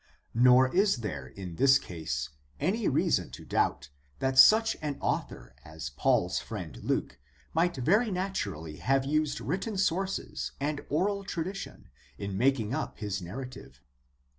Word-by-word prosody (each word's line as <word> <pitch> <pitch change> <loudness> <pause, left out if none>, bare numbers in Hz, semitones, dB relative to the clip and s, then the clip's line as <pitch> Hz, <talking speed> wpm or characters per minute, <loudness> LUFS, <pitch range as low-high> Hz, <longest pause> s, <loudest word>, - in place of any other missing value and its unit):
Nor 125 +4 +5
is 195 - +3
there 70 -9 -4
in 90 +3 -8
this 135 0 +6
case 80 - -4 0.3
any 215 +4 0
reason - - +1
to - - -12
doubt - - 0 0.3
that 130 0 -1
such 225 +5 +7
an 150 -2 -3
author - - -3
as 75 -3 -7
Paul's 70 - +1
friend - - -7
Luke 65 - -2 0.3
might 175 +2 +2
very 205 - +3
naturally 100 - -3
have 135 0 +1
used 155 +1 0
written 195 - -3
sources 190 +1 -1
and 145 +1 -2
oral 200 +6 0
tradition 190 +1 -5 0.3
in 100 +2 -4
making 120 0 +1
up - - -3
his 100 -3 -3
narrative. 125 - -8
135 Hz, 140 wpm, -29 LUFS, -, 0.3 s, such